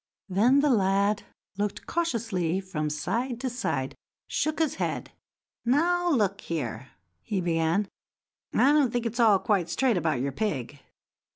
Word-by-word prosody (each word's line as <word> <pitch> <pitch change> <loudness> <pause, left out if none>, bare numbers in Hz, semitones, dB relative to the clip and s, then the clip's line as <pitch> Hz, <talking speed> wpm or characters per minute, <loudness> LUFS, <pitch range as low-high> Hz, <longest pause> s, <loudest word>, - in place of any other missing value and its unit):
Then 235 +9 +4
the 295 -1 +3
lad 200 -1 +2 0.4
looked 205 0 -2
cautiously 225 - -1
about 190 0 -6
from 155 -3 -1
side 230 - -2
to 260 -2 -2
side, 245 - -2
and - - -17 0.3
shook 310 0 -1
his 320 -4 +1
head. - - -2 0.5
"Now, 350 +8 +2
look 205 - +1
here," 130 -6 -4 0.3
he 200 - -2
began; 170 +3 +1 0.6
"I 275 - +4
don't 290 -4 +4
think 240 -1 -1
it's 230 +2 -3
all 220 -4 +6
quite 190 -4 0
straight 235 +5 +2
about 160 -6 0
your 140 +2 -1
pig. 145 - -3
205 Hz, 155 wpm, -27 LUFS, 170-250 Hz, 0.6 s, all